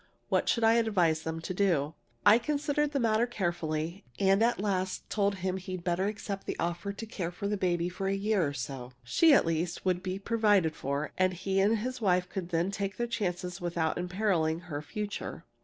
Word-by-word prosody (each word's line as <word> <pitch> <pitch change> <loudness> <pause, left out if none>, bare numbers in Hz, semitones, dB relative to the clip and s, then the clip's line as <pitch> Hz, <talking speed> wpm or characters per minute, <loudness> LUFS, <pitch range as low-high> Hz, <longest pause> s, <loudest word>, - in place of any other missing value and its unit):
What - - +2
should 230 - +2
I 225 0 +6
advise 180 -9 +2
them 160 0 -4
to 185 - -4
do? 170 -6 +1 0.3
"I 210 +3 +8
considered 295 +2 0
the 280 - 0
matter 225 0 +2
carefully, 170 -5 -2
and 195 +1 +3
at 235 -2 +2
last 190 -2 -1
told 200 -1 +1
him 185 0 -2
he'd 185 -1 -6
better 180 +2 +1
accept 205 -2 -5
the - - -3
offer 175 +4 -2
to 200 +3 -7
care 195 -6 -4
for 200 +3 -4
the 210 - 0
baby 175 -3 0
for 180 +2 -3
a 195 - +1
year 200 -1 +1
or 140 - -3
so. 125 -1 -6
She, 315 - +4
at 280 - +6
least, 165 +2 -2
would 180 -1 +1
be 185 0 -3
provided 205 -6 +2
for, 140 +2 -2
and 185 0 +3
he 190 +2 0
and 210 +4 +4
his 250 +3 -4
wife 180 -3 +2
could 180 -3 -4
then 170 +2 0
take 200 0 -3
their 240 - 0
chances 180 -5 -3
without 170 -1 -1
imperiling 180 -3 0
her 155 -5 -5
future. 210 +7 -5
185 Hz, 205 wpm, -30 LUFS, 170-210 Hz, 0.3 s, I